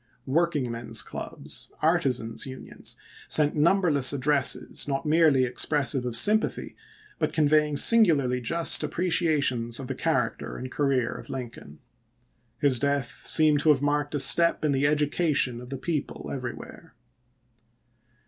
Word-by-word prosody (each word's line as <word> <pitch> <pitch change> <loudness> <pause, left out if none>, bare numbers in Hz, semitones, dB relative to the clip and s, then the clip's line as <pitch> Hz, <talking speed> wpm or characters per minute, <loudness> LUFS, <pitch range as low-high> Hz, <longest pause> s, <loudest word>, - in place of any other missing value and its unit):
Work 170 +5 0
ingmen's 115 -5 -3
clubs, - - -6
artisans' 140 -7 0
unions, 130 0 -8 0.3
sent 150 -1 +1
numberless 155 -4 +2
addresses, 140 0 0
not 135 +2 -3
merely 155 -4 +3
expressive 135 +1 -1
of 120 - -1
sympathy, 215 - +1 0.4
but - - -1
conveying 150 -1 +2
singularly 145 - +3
just 165 +7 +1
appreciations 150 -9 0
of 135 - -6
the - - -4
character - - -2
and 130 +1 -8
career 135 -5 -1
of - - -11
Lincoln. 115 - -9 0.8
His 140 -5 +2
death 140 -4 -2
seemed 155 -2 +5
to 155 - +1
have 145 -2 +3
marked 145 0 -1
a - - -1
step 170 +3 +5
in 150 - +1
the 140 +1 +1
education 145 -4 0
of 125 - -12
the 135 - -5
people 150 +2 -5
everywhere. 125 -3 -9
145 Hz, 130 wpm, -25 LUFS, 130-155 Hz, 0.8 s, seemed